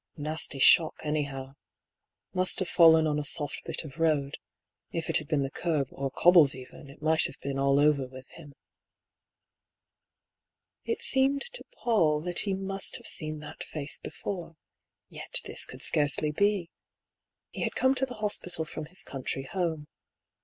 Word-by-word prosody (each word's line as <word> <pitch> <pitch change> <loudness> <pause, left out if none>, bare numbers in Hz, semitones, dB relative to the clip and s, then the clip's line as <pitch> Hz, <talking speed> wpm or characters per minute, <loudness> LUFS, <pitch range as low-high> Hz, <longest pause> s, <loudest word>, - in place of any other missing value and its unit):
Nasty 150 -1 0
shock, 155 +4 +5
anyhow. 140 -3 -3 0.8
Must 185 0 +2
have 185 - -2
fallen 160 -2 +6
on 150 -1 0
a - - -3
soft 145 0 +2
bit - - -1
of 155 0 -11
road; 150 -4 0 0.5
if 165 -1 -3
it - - +7
had 155 - -5
been 150 -4 0
the 135 - -4
kerb, 150 -6 -1
or 135 0 -4
cobbles 165 -2 +6
even, 130 +2 -12
it 140 +2 -15
might 160 0 +3
have - - -13
been 135 0 -4
all 140 0 +3
over 145 -3 +2
with 130 0 -12
him." 145 -4 -14 2.3
It 460 +1 -2
seemed 270 +1 +1
to - - -8
Paull 165 - +2
that 175 +1 +1
he 200 - +3
must 195 0 -3
have - - -10
seen 155 -2 -3
that 150 - -9
face 150 -2 -6
before. 175 -4 -7 0.5
Yet - - -3
this - - -2
could - - -9
scarcely 150 +1 +3
be. 200 +1 0 0.8
He - - -7
had - - -2
come 260 +1 +3
to 265 0 0
the 250 - -8
hospital 205 -6 -2
from 155 0 -7
his 180 +4 -4
country 135 0 -4
home. 165 -5 -2
155 Hz, 165 wpm, -28 LUFS, 140-180 Hz, 2.3 s, it